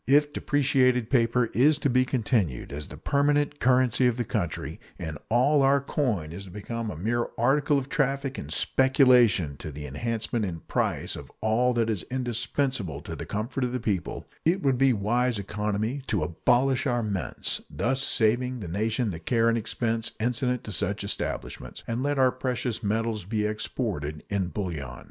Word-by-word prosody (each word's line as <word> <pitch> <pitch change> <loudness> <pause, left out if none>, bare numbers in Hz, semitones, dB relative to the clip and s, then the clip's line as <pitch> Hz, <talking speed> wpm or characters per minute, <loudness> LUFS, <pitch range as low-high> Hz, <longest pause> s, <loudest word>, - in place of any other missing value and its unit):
If 145 +2 +4
depreciated 130 -4 +2
paper 120 -2 +2
is 145 +5 +4
to 145 - 0
be 130 0 +3
continued 110 - 0
as 75 +1 -5
the 75 - -10
permanent 145 - +1
currency 125 0 +3
of 120 -1 0
the 120 - 0
country, 100 -8 -3 0.2
and 80 -1 -5
all 135 +6 +4
our 135 +1 +4
coin 120 - -1
is 95 +4 -7
to - - -11
become 110 +4 -5
a 95 - -6
mere 120 +7 0
article 140 +4 +3
of 135 -1 -2
traffic 140 -1 -1
and - - -7
speculation 125 - +4
to 75 - -7
the 75 +1 -7
enhancement 110 - -2
in 85 -5 -4
price - - -1
of - - -10
all 115 +3 +2
that 115 -2 +2
is 110 -5 -1
indispensable 125 - -1
to - - -7
the - - -7
comfort 120 +5 -2
of 125 0 -1
the 125 - -1
people, 100 -7 -2 0.2
it 180 +4 +2
would 135 -3 +2
be 135 -1 +5
wise 120 +3 +1
economy 105 +5 -2
to 100 -7 0
abolish 125 - +2
our 120 -2 +1
mints, 95 - -2
thus 130 +2 0
saving 125 +1 +1
the 100 - -6
nation 110 +5 0
the 80 - -6
care 115 +7 +2
and 115 - +2
expense 115 0 -2
incident 125 +2 0
to 105 - -6
such 100 +1 -1
establishments, 100 - -4
and 115 +2 -2
let 145 +1 0
our 130 -1 +5
precious 125 -2 -2
metals 110 0 -1
be 105 +3 -1
exported 105 - -3
in 100 -2 0
bullion. 80 - -4
115 Hz, 175 wpm, -27 LUFS, 105-130 Hz, 0.2 s, be